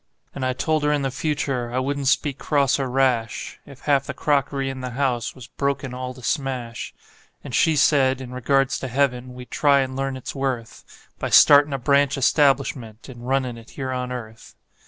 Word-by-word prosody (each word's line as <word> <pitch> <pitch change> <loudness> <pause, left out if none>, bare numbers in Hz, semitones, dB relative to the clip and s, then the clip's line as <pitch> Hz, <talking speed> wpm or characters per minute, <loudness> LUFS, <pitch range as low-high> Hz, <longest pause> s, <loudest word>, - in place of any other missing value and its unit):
And 135 - -5
I 130 0 +1
told 155 +3 0
her 150 - +2
in 145 -1 0
the 135 - -1
future 135 -4 -2
I 125 - -2
wouldn't 140 +1 -1
speak 140 +1 +1
cross 140 -2 +1
or 135 -2 -1
rash 125 -4 0
If 140 -2 -13
half 140 -2 +1
the 140 - -5
crockery 140 -1 0
in 135 -1 -5
the 125 - -4
house 125 -5 -1
was 130 -3 -11
broken 140 0 -3
all 125 0 -5
to 125 - -13
smash; 125 -2 -3 0.5
And - - -8
she 160 - +3
said, 135 -3 +3
in 130 -2 -8
regards 135 +2 +1
to 130 - -4
heaven, 125 -1 -1
we'd 125 0 -11
try 140 -2 +4
and 130 0 -3
learn 135 0 -2
its 130 - -7
worth 130 -4 -5
By - - -2
startin' 145 0 +7
a 135 - -1
branch 140 +2 +2
establishment 135 -5 +1
and 120 -1 -10
runnin' 130 -3 -1
it 115 - -16
here 130 -2 -3
on 125 0 -3
earth. 115 -3 -8
135 Hz, 200 wpm, -23 LUFS, 125-140 Hz, 0.5 s, startin